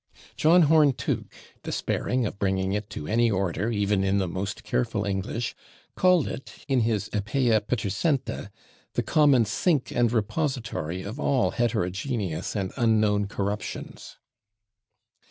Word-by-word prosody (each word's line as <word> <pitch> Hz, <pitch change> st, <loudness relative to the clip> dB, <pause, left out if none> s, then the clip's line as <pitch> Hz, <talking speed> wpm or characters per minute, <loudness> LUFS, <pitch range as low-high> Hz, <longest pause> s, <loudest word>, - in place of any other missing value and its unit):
John 170 Hz, +3 st, +5 dB
Horne 150 Hz, -2 st, +5 dB
Tooke, -, -, -3 dB, 0.3 s
despairing 125 Hz, -1 st, -1 dB
of 105 Hz, -, -5 dB
bringing 95 Hz, -1 st, 0 dB
it 105 Hz, 0 st, -3 dB
to 75 Hz, -, -6 dB
any 115 Hz, +6 st, +2 dB
[Pg228] 105 Hz, -, 0 dB
order, 95 Hz, +3 st, -1 dB
even 105 Hz, -3 st, +1 dB
in 95 Hz, +1 st, +2 dB
the 95 Hz, -2 st, 0 dB
most 95 Hz, +3 st, -4 dB
careful 60 Hz, +11 st, -1 dB
English, 100 Hz, +4 st, -2 dB, 0.4 s
called 180 Hz, -4 st, +3 dB
it, 135 Hz, -, -7 dB
in 135 Hz, -3 st, +2 dB
his 110 Hz, -4 st, 0 dB
"Epea 110 Hz, +2 st, +1 dB
Ptercenta," 125 Hz, -, -1 dB, 0.4 s
"the -, -, 0 dB
common 140 Hz, -6 st, +4 dB
sink 140 Hz, -, 0 dB
and 120 Hz, -2 st, +2 dB
repository 110 Hz, -, -2 dB
of 110 Hz, +8 st, -6 dB
all 135 Hz, -4 st, +2 dB
heterogeneous 105 Hz, -, -2 dB
and 95 Hz, -3 st, -2 dB
unknown 110 Hz, -4 st, +2 dB
corruptions." 100 Hz, 0 st, -5 dB
110 Hz, 135 wpm, -26 LUFS, 100-130 Hz, 0.4 s, John